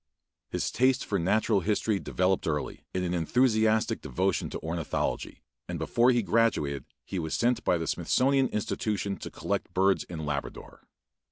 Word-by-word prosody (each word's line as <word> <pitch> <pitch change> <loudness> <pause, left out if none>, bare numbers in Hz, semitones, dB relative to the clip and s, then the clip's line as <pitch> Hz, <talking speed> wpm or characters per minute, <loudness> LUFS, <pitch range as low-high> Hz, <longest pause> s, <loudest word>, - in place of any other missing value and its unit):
His - - -2
taste 130 +1 +2
for 100 - 0
natural 105 +4 +2
history 105 +2 0
developed 95 0 0
early 75 -2 -3
in 90 - -2
an 90 -1 -1
enthusiastic 110 +4 +2
devotion 90 +8 -1
to - - -5
ornithology, 80 0 -3 0.3
and - - -3
before 120 +1 +2
he 120 -2 +3
graduated 95 - +1 0.2
he 95 - -3
was 80 -2 -2
sent 120 +1 +1
by 90 - +2
the 80 - -3
Smithsonian 135 +7 +2
Institution 105 -2 -2
to - - -7
collect - - -3
birds 95 +1 +3
in 80 -3 -6
Labrador. 70 -1 -5
100 Hz, 155 wpm, -28 LUFS, 85-115 Hz, 0.3 s, he